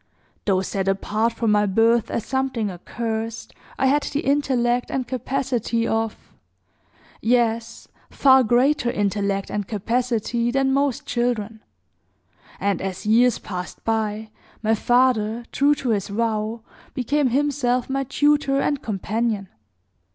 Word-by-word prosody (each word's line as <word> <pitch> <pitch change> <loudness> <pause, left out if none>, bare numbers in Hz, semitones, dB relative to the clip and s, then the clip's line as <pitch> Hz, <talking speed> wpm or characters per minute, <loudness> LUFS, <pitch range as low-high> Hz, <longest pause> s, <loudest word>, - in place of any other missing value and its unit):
Though 190 -2 +2
set 195 0 -3
apart 210 +4 0
from 230 -1 0
my 210 0 +3
birth 225 +3 +3
as 225 - -3
something 260 -6 -1
accursed, 225 +4 -5 0.2
I 270 - +1
had 285 +3 +3
the 290 +1 -2
intellect 250 -4 +1
and 260 -2 -2
capacity 245 -2 -1
of 225 -1 -1 1.0
yes, 230 -1 0 0.2
far 265 -1 +5
greater 245 +3 +2
intellect 200 -2 -1
and 205 -2 -3
capacity 235 +2 -1
than, 265 +1 +1
most 275 -2 0
children; 225 -3 -2 1.0
and, 200 -2 0
as 190 0 -5
years 235 +3 +4
passed 180 -2 -7
by, 220 -1 -2 0.3
my 220 +1 +3
father, 240 -1 +2
true 290 +1 +3
to 260 -3 -4
his 200 -3 0
vow, 220 +1 -2 0.3
became 280 +3 +1
himself 255 -2 +1
my 275 0 -1
tutor 285 0 +2
and 285 0 0
companion. 215 -1 -2
230 Hz, 125 wpm, -23 LUFS, 215-260 Hz, 1.0 s, far